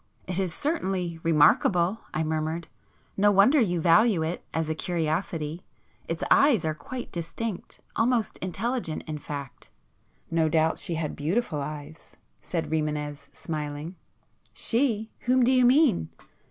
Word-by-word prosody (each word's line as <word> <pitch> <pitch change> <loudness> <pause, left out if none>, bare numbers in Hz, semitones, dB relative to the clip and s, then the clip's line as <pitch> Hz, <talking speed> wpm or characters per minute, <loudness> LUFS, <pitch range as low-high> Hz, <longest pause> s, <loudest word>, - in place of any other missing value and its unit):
"It 180 +1 -2
is 185 -3 0
certainly 185 - -2
remarkable,"—I 165 +3 +3
murmured—"No 160 +5 -2
wonder 205 +9 +5
you 175 -6 +1
value 180 +1 +4
it,—as 160 -1 -3
a 160 - 0
curiosity. 160 0 -2 0.4
Its - - -3
eyes 270 - +5
are 155 - 0
quite 240 - -7
distinct, 180 +4 -5
almost 230 -2 +1
intelligent 195 0 -2
in 155 -1 -5
fact." 140 -2 -8 0.6
"No 165 -1 +2
doubt 160 0 +2
she 170 - -3
had 160 -2 -3
beautiful 160 0 -1
eyes,"—said 155 +3 -7
Rimânez 150 -2 -2
smiling. 150 +2 -5 0.6
"She? 225 -3 0 0.2
Whom 255 0 +4
do 245 - +4
you 255 -1 +5
mean?" 250 - +4
170 Hz, 120 wpm, -27 LUFS, 155-220 Hz, 0.6 s, wonder